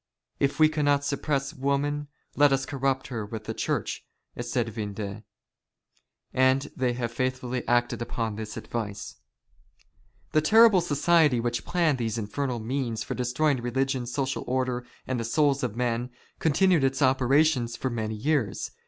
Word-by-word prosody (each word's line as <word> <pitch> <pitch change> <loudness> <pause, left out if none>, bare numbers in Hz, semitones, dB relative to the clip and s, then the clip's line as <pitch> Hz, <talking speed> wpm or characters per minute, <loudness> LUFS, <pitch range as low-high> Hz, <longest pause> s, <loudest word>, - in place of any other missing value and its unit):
"If 140 +2 0
we 155 - +8
cannot 145 -2 +1
suppress 140 -1 -1
woman 145 +2 -1 0.3
let 145 -1 +5
us 135 -1 +1
corrupt 135 -1 -1
her 115 -4 -3
with 110 +1 -6
the - - -4
Church," - - -2 0.4
said 120 0 -1
Vindex, 105 -1 -5 1.1
and 130 +2 +2
they 125 -1 0
have 120 -1 -3
faithfully 130 0 -2
acted 120 0 +1
upon 115 -2 -3
this 105 0 -6
advice. 105 -4 -5 1.1
The 155 - +3
terrible 215 +3 +6
society 155 -3 +3
which 120 0 -2
planned 165 -7 +1
these 115 -1 -1
infernal 120 +4 -2
means 115 -1 -2
for - - -4
destroying 130 +2 0
religion, 130 +1 -1
social 135 +2 -2
order, 125 -1 -1 0.2
and 130 -2 -2
the - - -2
souls 140 +3 +2
of 120 -4 -2
men, 120 0 -1 0.3
continued 165 0 +3
its 135 0 +1
operations 130 -1 +3
for 130 - -2
many 110 -2 -3
years. 125 -3 -1
130 Hz, 145 wpm, -27 LUFS, 120-145 Hz, 1.1 s, we